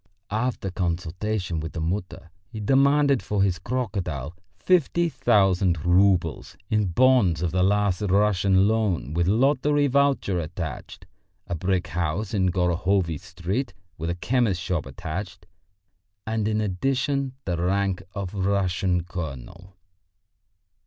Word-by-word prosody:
After 110 -3 -2
consultation 90 +1 -2
with 80 +1 -6
the - - -4
Mutter 90 +1 -4 0.2
he 110 - -7
demanded 140 +4 +3
for 105 -2 0
his 90 -4 0
crocodile 90 - -3 0.2
fifty 170 -1 +2
thousand 95 - +2
roubles 90 -4 +2
in 105 -2 +2
bonds 95 -5 +3
of 85 - 0
the 90 +2 +1
last 100 0 +2
Russian 100 -1 +3
loan 100 - 0
with 85 +1 +1
lottery 140 +6 +2
voucher 140 -9 +2
attached, 80 0 -6 0.4
a - - -5
brick 90 +1 -1
house 90 +5 -2
in 95 -3 +2
Gorohovy 90 -1 +1
Street 90 +5 -4 0.2
with 85 +1 -3
a 85 - -1
chemist's 105 -2 0
shop 90 -6 -2
attached, 90 +5 -6 0.8
and 110 -1 -1
in 110 0 0
addition 135 +7 -1
the 90 -2 -1
rank 95 +2 0
of 100 -2 -4
Russian 95 -2 0
colonel. 85 +2 -8
95 Hz, 125 wpm, -25 LUFS, 85-110 Hz, 0.8 s, demanded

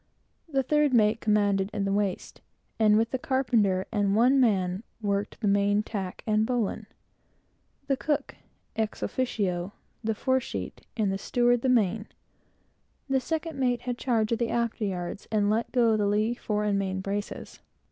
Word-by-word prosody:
The 270 -3 +1
third 295 0 +2
mate 220 0 +3
commanded 205 -2 +2
in 200 -2 -1
the 195 - 0
waist, 200 -2 -2 0.4
and, 215 -1 +5
with 225 +1 +1
the 260 - -1
carpenter 225 -9 +1
and 205 -2 +1
one 250 +5 +5
man, 190 -6 +2 0.2
worked 200 -1 -2
the 210 - +1
main 200 +1 +3
tack 195 -4 -5
and 215 -1 +2
bowlines; 235 -3 -1 1.0
the 275 -1 +1
cook, 295 +2 -2 0.4
ex 220 -1 -2
officio, 200 -7 -1 0.3
the 220 0 0
fore 260 +4 +1
sheet, 255 - -6 0.2
and 210 -3 +1
the 195 - -2
steward 245 +2 +2
the 260 - +1
main. 220 -3 +2 1.0
The 270 0 +3
second 320 +2 -3
mate 245 -2 +1
had 245 -1 -4
charge 230 -4 +1
of 230 - +1
the 235 -1 0
after 235 -2 -1
yards, 180 0 -4
and 210 -1 +2
let 225 +2 0
go 235 -3 +3
the 210 -1 +1
lee 215 +3 +1
fore 210 -3 -2
and 205 -1 +1
main 190 -1 -2
braces. 200 +1 -5
215 Hz, 165 wpm, -27 LUFS, 200-245 Hz, 1.0 s, and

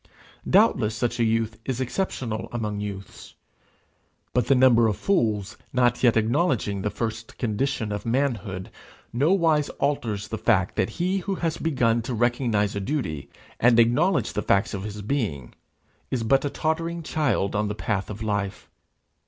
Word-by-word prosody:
Doubtless 110 +1 +4
such 120 +1 -1
a - - +3
youth 110 -1 0
is 130 0 -3
exceptional 130 - -3
among 105 -3 -3
youths; 100 -2 -7 1.0
but 125 - +1
the 135 - +5
number 125 -3 +5
of 105 -4 -1
fools 110 - 0 0.2
not 120 -1 +2
yet 120 -3 +4
acknowledging 110 - +1
the 105 - -1
first 110 +1 -5
condition 120 0 -1
of 105 - -3
manhood 115 -7 -1 0.4
nowise 155 +2 +3
alters 115 -8 -1
the 110 - -4
fact 105 -4 +2
that - - +1
he 185 +3 +1
who 195 +1 -3
has 165 -3 -2
begun 120 -7 +1
to 120 +2 -4
recognize 120 -3 +1
duty, 100 - -3 0.3
and 120 0 +5
acknowledge 150 +11 +3
the 105 - -1
facts 100 -1 +1
of 100 0 -4
his 105 -1 -6
being, 100 - -2 0.6
is 125 -3 -1
but 135 +4 +3
a - - 0
tottering 165 +3 -2
child 130 -11 0
on 105 +1 +1
the 105 - -3
path 105 -3 -2
of 105 +1 -6
life. 100 -2 -3
115 Hz, 155 wpm, -25 LUFS, 105-135 Hz, 1.0 s, the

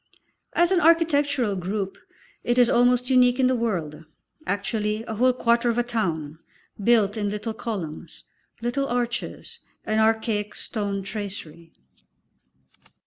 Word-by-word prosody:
As 345 +1 +3
an 365 -2 +3
architectural 290 - +3
group 195 +1 -3 0.5
it 240 +1 0
is 245 -1 +5
almost 245 +1 +3
unique 250 0 +4
in 260 - +4
the 255 - +3
world, 170 -10 -2 0.4
actually 210 +1 -1
a 225 - -6
whole 250 +4 +3
quarter 240 -1 +2
of 235 - 0
a 240 - +3
town, 165 -10 -3 0.4
built 220 -2 +3
in 205 -1 -1
little 210 +2 -4
columns, 170 -9 -6 0.4
little 275 +3 -1
arches 240 -1 -3 0.3
and 215 0 +1
archaic 220 -1 0
stone 200 -3 -3
tracery. 190 -6 -7
225 Hz, 130 wpm, -24 LUFS, 200-245 Hz, 0.5 s, is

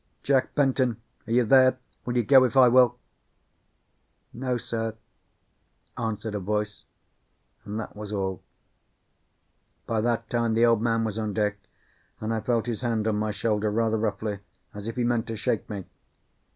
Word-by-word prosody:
"Jack 135 -2 +1
Benton, 130 -5 +2 0.3
are - - -6
you 120 +1 +4
there? 130 +1 +5 0.3
Will 120 0 -1
you 120 - +3
go 130 +3 +7
if 130 +1 0
I 130 -1 +8
will?" 125 0 +5 1.4
"No, 125 0 -2
sir," 115 -1 -3 1.0
answered 110 -1 -3
a 105 - -2
voice; 105 +2 -3 0.8
and 105 +1 -4
that 110 - -7
was 105 0 -7
all. 95 -4 -2 1.4
By 110 -1 0
that 115 0 0
time 115 -1 0
the 115 +1 +5
Old 115 -2 +3
Man 115 -1 +1
was 110 -1 -2
on 105 -2 -2
deck, 105 -1 0 0.6
and 110 +1 -2
I 110 - 0
felt 115 -1 0
his 120 -2 -3
hand 115 -3 0
on 105 -1 +1
my 105 +1 -1
shoulder 105 +1 0
rather 110 +1 +1
roughly, 105 -1 -2 0.3
as 105 0 -7
if 115 - -4
he 125 - 0
meant 120 -1 0
to 115 - -4
shake 110 0 -2
me. 100 -3 -5
115 Hz, 165 wpm, -26 LUFS, 105-120 Hz, 1.4 s, I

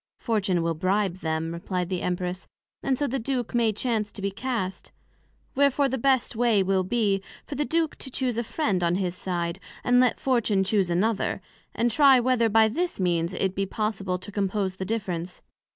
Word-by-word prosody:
Fortune 200 -7 0
will 165 0 0
bribe 185 +2 0
them, 160 0 -2
replied 180 +1 -3
the 185 -2 -2
Empress, 180 +1 -3 0.3
and 265 -1 0
so 290 - 0
the 270 0 -1
Duke 250 -1 -2
may 235 -2 +3
chance 215 -1 -1
to 200 - -8
be 200 - 0
cast: 195 -4 -4 0.6
Wherefore 280 0 +3
the 265 0 -2
best 260 -1 +2
way 225 -4 +3
will 190 0 +2
be, 200 -1 +1 0.2
for - - -7
the 295 +1 -1
Duke 325 0 0
to 265 - -6
chuse 255 -2 -1
a - - 0
Friend 215 - -1
on 170 0 +2
his 185 -2 -1
side, 175 -1 -2 0.2
and 245 0 +4
let 250 -2 +3
Fortune 230 -7 +2
chuse 195 -2 +1
another, 200 +5 0 0.4
and 235 +1 +1
try 270 +1 +6
whether 240 -2 +2
by 220 +1 +5
this 340 - -2
means 170 -2 0
it 190 -1 0
be 195 0 -1
possible 195 -3 -2
to 185 +3 -9
compose 195 -1 -1
the 190 - -4
Difference. 185 -5 -4
205 Hz, 190 wpm, -26 LUFS, 185-245 Hz, 0.6 s, try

